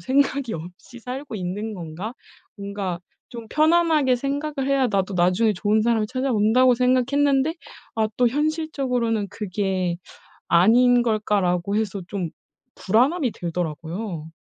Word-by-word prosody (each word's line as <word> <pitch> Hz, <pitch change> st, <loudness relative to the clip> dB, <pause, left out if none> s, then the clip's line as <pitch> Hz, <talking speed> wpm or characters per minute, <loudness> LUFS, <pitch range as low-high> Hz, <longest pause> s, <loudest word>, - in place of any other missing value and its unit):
생각이 275 Hz, -2 st, +1 dB
없이 180 Hz, +9 st, -10 dB
살고 255 Hz, +1 st, -6 dB
있는 205 Hz, +3 st, -4 dB
건가?' 175 Hz, +6 st, -6 dB, 0.4 s
뭔가 200 Hz, -3 st, -4 dB, 0.3 s
좀 235 Hz, -2 st, -8 dB
편안하게 310 Hz, -4 st, +3 dB
생각을 280 Hz, +1 st, -3 dB
해야 275 Hz, -2 st, +3 dB
나도 195 Hz, -2 st, -1 dB
나중에 180 Hz, +5 st, +3 dB
좋은 210 Hz, +3 st, +1 dB
사람이 225 Hz, -2 st, +1 dB
찾아온다고 250 Hz, -1 st, +3 dB
생각했는데 270 Hz, +4 st, +2 dB, 0.4 s
아 220 Hz, -1 st, +2 dB
또 245 Hz, -1 st, +4 dB
'현실적으로는 265 Hz, -7 st, -1 dB
그게 190 Hz, -3 st, -2 dB, 0.5 s
아닌 240 Hz, +8 st, +5 dB
걸까?'라고 200 Hz, -4 st, 0 dB
해서 205 Hz, -3 st, -1 dB
좀 180 Hz, -4 st, -3 dB, 0.5 s
불안함이 250 Hz, -, +2 dB
들더라고요. 170 Hz, +1 st, -5 dB
225 Hz, 295 characters per minute, -23 LUFS, 190-260 Hz, 0.5 s, 아닌